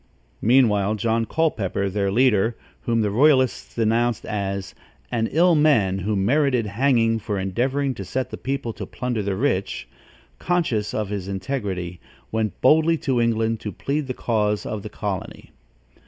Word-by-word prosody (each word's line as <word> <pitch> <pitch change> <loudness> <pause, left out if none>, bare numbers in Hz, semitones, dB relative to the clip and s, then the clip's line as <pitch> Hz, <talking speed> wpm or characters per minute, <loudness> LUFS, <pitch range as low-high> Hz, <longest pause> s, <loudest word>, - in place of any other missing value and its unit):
Meanwhile, 110 -4 +3
John 115 +1 0
Culpepper, 110 - 0
their 100 0 -1
leader, 115 -1 +2 0.3
whom 115 -1 +2
the 105 -2 0
royalists 130 +2 +2
denounced 115 0 +1
as 100 -2 -3 0.4
an 115 -2 0
"ill 175 +3 +4
man, 115 - +3
who 105 +3 -1
merited 125 +4 +2
hanging 115 +1 +2
for 105 -1 -3
endeavoring 130 +9 0
to 100 - -7
set 125 +7 -3
the - - -5
people 135 -3 -3
to - - -7
plunder 125 -3 -3
the 100 -1 -2
rich," 100 -4 -1 0.5
conscious 155 -12 0
of 105 -2 -2
his 100 -3 -4
integrity, 95 -4 -4 0.3
went 110 -2 -2
boldly 160 +4 +4
to 130 -5 0
England 115 -1 +1
to 105 - -5
plead 145 +4 -2
the 130 - -4
cause 105 -3 0
of 110 - -4
the - - -7
colony. - - -5
115 Hz, 155 wpm, -23 LUFS, 100-130 Hz, 0.5 s, ill